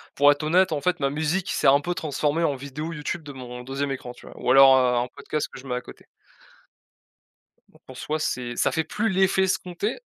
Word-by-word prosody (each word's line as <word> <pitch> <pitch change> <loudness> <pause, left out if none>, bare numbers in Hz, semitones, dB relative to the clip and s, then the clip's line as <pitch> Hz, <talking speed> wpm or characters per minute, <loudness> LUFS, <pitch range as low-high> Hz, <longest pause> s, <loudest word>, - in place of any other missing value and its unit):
Pour 145 +1 +6
être 145 +1 -2
honnête, 180 +4 +3
en 150 - -1
fait, 180 +2 0
ma 140 -1 +1
musique 160 +6 -1
s'est - - +1
un 140 +1 +6
peu 175 +4 -2
transformée 155 +1 -1
en 145 -4 +1
vidéo 140 +5 -6
YouTube 160 +1 -4
de 145 - -9
mon 125 -1 -8
2e 135 +2 -3
écran, 130 -2 -6
tu - - -17
vois, - - -13
ou 125 - 0
alors, 135 0 +8
heu, 125 -1 +2
en 120 +1 0
podcast 150 +4 -4
que - - -10
je 130 - -14
mets 125 - -2
à 125 - -3
côté. - - -14 1.6
Bon, - - -23
pour 130 - -12
soi 155 +4 -3
c'est 125 -5 -3
ça - - +1
fait 160 -2 0
plus 210 +8 -2
l'effet 190 0 +2
escompté 190 +3 -2
145 Hz, 230 wpm, -24 LUFS, 130-165 Hz, 1.6 s, alors